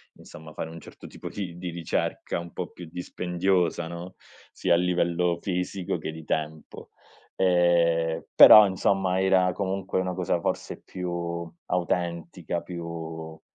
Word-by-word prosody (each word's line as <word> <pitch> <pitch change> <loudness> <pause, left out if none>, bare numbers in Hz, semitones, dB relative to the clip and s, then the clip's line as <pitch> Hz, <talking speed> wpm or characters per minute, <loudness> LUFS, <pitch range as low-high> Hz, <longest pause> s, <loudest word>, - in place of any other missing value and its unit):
insomma 80 0 -12
fare 80 - -5
un 85 0 -10
certo - - -12
tipo - - -8
di 90 -4 -6
di 90 0 -5
ricerca 85 0 -2
un 85 0 -7
po' 90 - -4
più 90 -2 -10
dispendiosa, 90 0 -1
no, 85 +2 -8 0.4
sia - - +1
a - - +5
livello 90 -1 +1
fisico 90 0 -2
che - - -4
di 80 -1 -10
tempo. 80 0 -4 0.5
Ehm, 85 -3 +2
però 105 -1 +10
insomma 95 0 +1
era 95 -1 +3
comunque 95 0 -2
una 90 0 -2
cosa 90 -1 0
forse - - -3
più 90 -1 -5 0.6
autentica 85 -1 -2
più, 80 -2 -7
90 Hz, 135 wpm, -26 LUFS, 85-90 Hz, 0.6 s, però